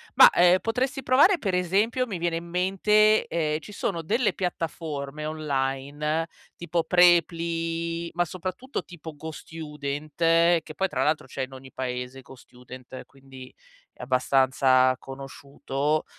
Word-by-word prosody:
Ma, - - +10
eh, 180 +1 +5
potresti 260 +5 -2
provare 295 +10 +5
per 195 - -2
esempio, 205 +8 +1
mi 200 -7 -5
viene 170 0 -1
in 165 - -4
mente, 195 +5 +3
ehm, 155 -2 -1
ci 210 - -12
sono 170 -4 -3
delle 220 +8 +1
piattaforme 155 -5 -4
online, 150 +1 -2 0.3
tipo 170 -1 -1
Preply, 170 -1 +2
ma 175 +1 +1
soprattutto 185 - -5
tipo 160 -3 -10
GoStudent, 150 -2 -7
che 165 -1 +3
poi 190 - 0
tra 135 -4 -1
l'altro 150 -3 0
c'è 130 +1 -4
in 130 +1 -7
ogni 130 0 -12
paese 125 0 -5
GoStudent, 125 0 -12
quindi 135 -1 -14 0.4
è - - -14
abbastanza 130 0 +3
conosciuto; 140 +2 -3
160 Hz, 130 wpm, -25 LUFS, 135-175 Hz, 0.4 s, Ma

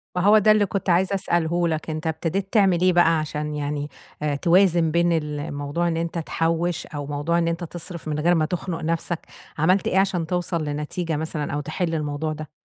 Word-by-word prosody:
ما 180 - +1
هو 210 +3 +6
ده 215 +1 +5
اللي 215 -1 +4
كنت 195 -1 -3
عايزة 185 +3 +3
أسأله 175 -2 +1
لك، 160 0 -2
أنت 155 +1 -3
ابتديت 170 +6 -2
تعمل 190 -5 +4
إيه 185 0 +4
بَقى 165 -2 +4
عشان 150 0 -3
يعني 145 0 -3 0.5
توازن 170 -2 +4
بين 170 +1 +2
ال 150 -2 -2
الموضوع 145 +3 -2
إن 165 - -1
أنت 170 +1 -3
تحوِّش 165 +1 -1
أو 145 -2 -6
موضوع 145 +4 0
إن 170 - +1
أنت 170 +1 -2
تِصرِف 170 0 -7
من 150 -1 -2
غير 175 +3 +3
ما 155 -1 +2
تخنق 170 0 -4
نَفْسك، 165 +1 -1 0.4
عملت 180 +5 +2
إيه 190 - +1
عشان 185 -4 0
توصل 175 -2 -1
لنتيجة 150 +3 -3
مثلًا 155 -2 -3
أو 145 - -1
تحل 165 +3 -2
الموضوع 150 +1 -2
ده؟ 155 0 -8
165 Hz, 200 wpm, -23 LUFS, 155-175 Hz, 0.5 s, هو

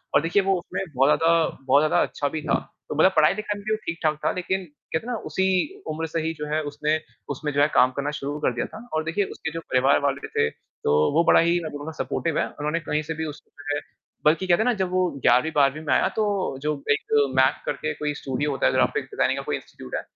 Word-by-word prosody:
और - - +6
देखिए 175 +5 +2
वो 195 0 +2
उसमें 175 - -5
बहुत 135 +2 +4
ज़्यादा 165 - +3 0.4
बहुत 140 +3 +5
ज़्यादा 155 - +3
अच्छा 145 - -2
भी 155 - -4
था, - - +1 0.3
तो - - -3
मतलब 190 +5 +5
पढ़ाई-लिखाई 205 +7 +2
में - - -12
भी 215 - -1
वो - - 0
ठीक-ठाक 160 -2 -1
था - - +3
लेकिन 185 +1 -2 0.3
कहते 190 +9 -1
ना 245 - -1 0.2
उसी 190 0 +1 0.4
उम्र 160 +1 -2
से 165 - 0
ही 160 +1 -2
जो 150 - -4
है 155 - +1
उसने 150 +1 0 0.3
उसमें 150 +2 -3
जो 145 - +3
है 145 - +5
काम 130 +1 +6
करना 145 +1 -1
शुरू 145 +2 -4
कर 125 - +1
दिया - - -1
था 235 +2 -10
और 155 0 0
देखिए 180 +5 0
उसके 160 - -4
जो 165 - -3
परिवार 130 +2 +4
वाले 140 0 -1
थे, 75 +1 +1
तो 75 - -1
वो 165 +2 +4
बड़ा - - +7
ही 170 +1 +3
नज़रों 145 -1 -6
में 160 - -4
सपोर्टिव 165 -2 -1
हैं। - - +2
उन्होंने 150 +3 -2
कहीं 150 -1 -1
से - - 0
भी 160 +1 -4
उसको - - -21
जो 145 0 -2
है - - -1 0.5
बल्कि 165 +5 +3
क्या 175 - +5
था 220 - +2
ना 250 - +3
जब 185 -1 0
वो 185 0 +2 0.2
11वीं 125 +7 +4
12वीं 140 +1 +3
में - - +2
आया - - +3
तो 220 - +2 0.4
जो 150 +1 0 0.2
एक 145 - -1 0.2
मैक 130 0 +3
करके 75 - -2
कोई 150 -1 -2
स्टूडियो 145 +1 -2
होता 135 - -1
है - - +3
ग्राफ़िक - - +2
डिज़ाइनिंग - - 0
का - - -4
कोई - - -1
इंस्टिट्यूट 65 - -8
है, - - -1
155 Hz, 255 wpm, -24 LUFS, 145-170 Hz, 0.5 s, बड़ा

